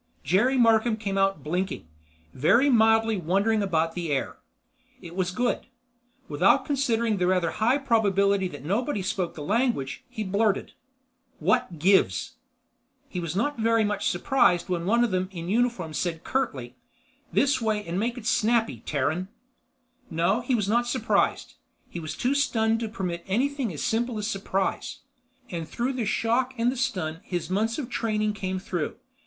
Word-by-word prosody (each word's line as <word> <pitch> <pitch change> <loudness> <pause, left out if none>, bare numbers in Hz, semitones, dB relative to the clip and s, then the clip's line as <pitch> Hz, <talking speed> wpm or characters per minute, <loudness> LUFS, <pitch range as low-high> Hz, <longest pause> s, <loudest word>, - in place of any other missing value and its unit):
Jerry 245 +9 +2
Markham 225 -1 +4
came 200 -3 -3
out 195 -6 +1
blinking; 175 - -3 0.5
very 235 - +4
mildly 225 -1 +4
wondering 200 +6 +1
about 165 -4 0
the 170 -3 -3
air. 135 - -2 0.6
It 170 -4 -11
was 185 -1 0
good. 240 +7 -1 0.6
Without - - +3
considering 235 -6 +1
the 180 -1 +1
rather 180 -3 +2
high 240 +5 +2
probability 200 -7 +2
that 145 -5 -10
nobody 205 - -1
spoke 180 -1 -2
the 150 - -6
language, 215 - 0
he 215 - -4
blurted: 205 +1 0 0.6
"What 245 -9 0
gives?" 170 - +2 0.7
He 180 - -4
was 170 -1 -4
not 240 +6 -1
very 225 0 +3
much 205 -1 0
surprised 180 -2 +2
when 175 -1 -2
one 235 +3 +4
of 240 - 0
them 185 0 -1
in 170 -2 -6
uniform 225 -7 0
said 165 +1 -2
curtly, 130 - -2 0.5
"This 275 -2 +2
way 215 -2 0
and 170 +3 -2
make 235 +3 -1
it 235 - -8
snappy, 220 - +1
Terran!" 150 +8 -1 0.8
No, 170 +8 +1
he 245 +1 0
was 210 -4 0
not 240 +3 +2
surprised. - - 0 0.4
He 175 - -5
was 155 -2 -6
too 255 +3 +1
stunned 225 -5 +1
to 225 -2 -3
permit 180 -5 -4
anything 260 +3 0
as 150 -4 -5
simple 235 +1 0
as 210 - -3
surprise. 195 -2 -2 0.5
And 165 -3 -5
through 250 +3 -2
the 250 -3 -2
shock 245 +4 0
and 235 +2 +2
the - - -5
stun, 170 -10 -2
his 175 -2 -4
months 220 +4 0
of 285 -5 -4
training 215 -3 -1
came 190 -2 -3
through. 180 -4 -3
205 Hz, 160 wpm, -26 LUFS, 180-235 Hz, 0.8 s, Markham